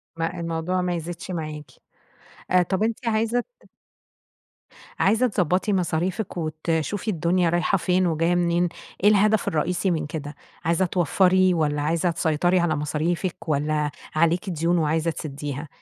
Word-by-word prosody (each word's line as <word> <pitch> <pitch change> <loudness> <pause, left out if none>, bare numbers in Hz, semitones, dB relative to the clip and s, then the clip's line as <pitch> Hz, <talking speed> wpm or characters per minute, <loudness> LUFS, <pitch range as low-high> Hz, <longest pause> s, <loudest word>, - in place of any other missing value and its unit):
ما 165 +2 -3
الموضوع 170 +2 -1
ما 180 -1 -1
يزيدش 170 +2 -6
معاكِ، 155 -4 -5 1.0
طب 190 +1 0
أنتِ 230 +2 -1
عايزة 225 +2 +1
ت - - -17 1.3
عايزة 225 +5 +3
تضبطي 185 0 +1
مصاريفِك 180 +2 -1
وتشوفي 160 +6 -2
الدنيا 175 0 +1
رايحة 175 +3 +2
فين 185 0 +1
وجاية 165 +1 +1
منين 175 0 +2 0.3
إيه 205 - +7
الهدف 210 +1 +3
الرئيسي 175 +4 0
من 155 -3 -1
كده؟ 150 -1 -6 0.3
عايزة 170 +3 +2
توفري 185 +2 +3
والّا 150 -3 0
عايزة 165 +3 +1
تسيطري 170 +3 +1
على 170 -2 +1
مصاريفِك 160 +5 -2
والّا 150 0 0 0.2
عليكِ 170 +5 +2
ديون 170 +1 +1
وعايزة 160 +1 +1
تسديها؟ 145 -1 -6
170 Hz, 135 wpm, -24 LUFS, 155-185 Hz, 1.3 s, إيه